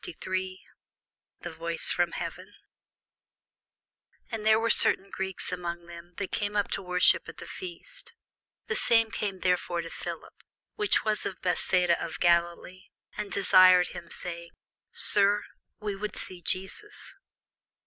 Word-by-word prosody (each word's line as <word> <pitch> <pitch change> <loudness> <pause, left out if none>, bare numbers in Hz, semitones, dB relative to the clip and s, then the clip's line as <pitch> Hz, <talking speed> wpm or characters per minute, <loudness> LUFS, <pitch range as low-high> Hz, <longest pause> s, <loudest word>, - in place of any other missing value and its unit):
CHAPTER 360 - -5 0.2
53 185 0 -3 0.8
THE 175 - -6
VOICE 165 +1 +1
FROM 175 -1 +1
HEAVEN - - -6 1.8
AND 225 -2 -4
there 220 0 +5
were 230 0 +2
certain 195 +1 +3
Greeks 190 -1 -3
among 170 -1 -5
them 170 0 -12
that 200 -2 -4
came 205 -1 -2
up 205 -1 0
to - - -1
worship 180 -1 +3
at - - -11
the - - -9
feast: 375 +7 -9 0.5
the - - -2
same 225 -1 +3
came 195 -4 -3
therefore 180 -1 0
to 165 - -9
Philip, - - -7 0.4
which 420 - +1
was 215 -1 +1
of - - -7
Bethsaida 180 -1 +2
of 165 - -6
Galilee, 175 +2 +1 0.3
and 205 - -5
desired 185 -2 +6
him, 170 - -9
saying, 170 -1 -6 0.4
Sir, 205 0 +3 0.4
we 210 -2 -3
would 210 0 -5
see 180 -1 -6
Jesus. 195 - -4
185 Hz, 140 wpm, -28 LUFS, 175-210 Hz, 1.8 s, desired